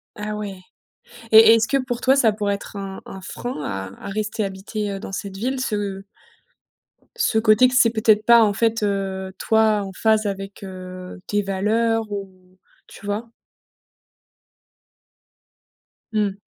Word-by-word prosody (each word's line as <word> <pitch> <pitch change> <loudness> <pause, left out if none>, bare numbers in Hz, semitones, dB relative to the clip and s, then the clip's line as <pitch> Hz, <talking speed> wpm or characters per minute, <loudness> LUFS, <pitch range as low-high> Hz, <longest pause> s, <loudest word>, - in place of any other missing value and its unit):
Ah, 210 0 -4
ouais! 205 -2 -5 0.8
Et 225 +1 +9
est-ce 225 -1 +2
que, 275 - +1
pour 245 -2 -3
toi, 265 +2 +4
ça 230 -6 +4
pourrait 205 -1 -1
être 200 +1 -9
un 195 -1 -6
un 190 - -9
frein 245 -4 -6
à 95 - -6
à - - -4
rester 215 +1 -2
habiter, 200 +2 -4
heu, 195 -1 -5
dans 195 - -8
cette 195 0 -5
ville? 255 +6 -2
Ce 205 -5 -2 1.1
ce 470 - +1
côté 220 +3 +5
que 255 - -3
c'est 240 -3 +6
peut-être 220 -1 +3
pas, 235 -1 +7
en 205 -2 +2
fait, 225 +1 0
heu, 190 -2 -2
toi, 220 -2 +2
en 195 - -6
phase 220 +2 +2
avec, 195 0 -5
heu, 185 -1 -9
tes 205 0 +1
valeurs 215 +3 0
ou 185 -2 -8 0.3
tu - - -13
vois? 210 +3 -3 2.8
Mmh. 205 -2 0
210 Hz, 155 wpm, -22 LUFS, 195-225 Hz, 2.8 s, Et